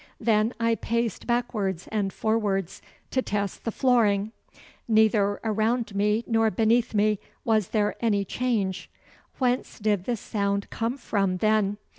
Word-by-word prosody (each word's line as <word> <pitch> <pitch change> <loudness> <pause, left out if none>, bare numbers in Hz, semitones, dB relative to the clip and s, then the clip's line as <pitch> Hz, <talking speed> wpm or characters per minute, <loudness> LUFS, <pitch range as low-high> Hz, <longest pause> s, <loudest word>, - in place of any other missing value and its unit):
Then 220 0 +2
I 230 0 +2
paced 230 -1 -2
backwards 215 -7 -1
and 205 -3 0
forwards 200 -5 -1 0.3
to 260 - +1
test 200 -4 -3
the 230 - 0
flooring. 220 -5 +2 0.6
Neither 215 -2 +3
around 220 +1 0
me 210 +3 +1
nor 225 -1 +2
beneath 225 +3 +1
me 210 0 +2 0.3
was 215 -4 +2
there 210 -2 0
any 205 -4 +1
change. 200 -4 -2 0.5
Whence 250 -1 0
did 205 -3 0
the 240 -2 -1
sound 200 -1 -2
come 230 +4 -2
from, 195 -7 0
then? 210 0 +2
215 Hz, 135 wpm, -26 LUFS, 200-230 Hz, 0.6 s, Neither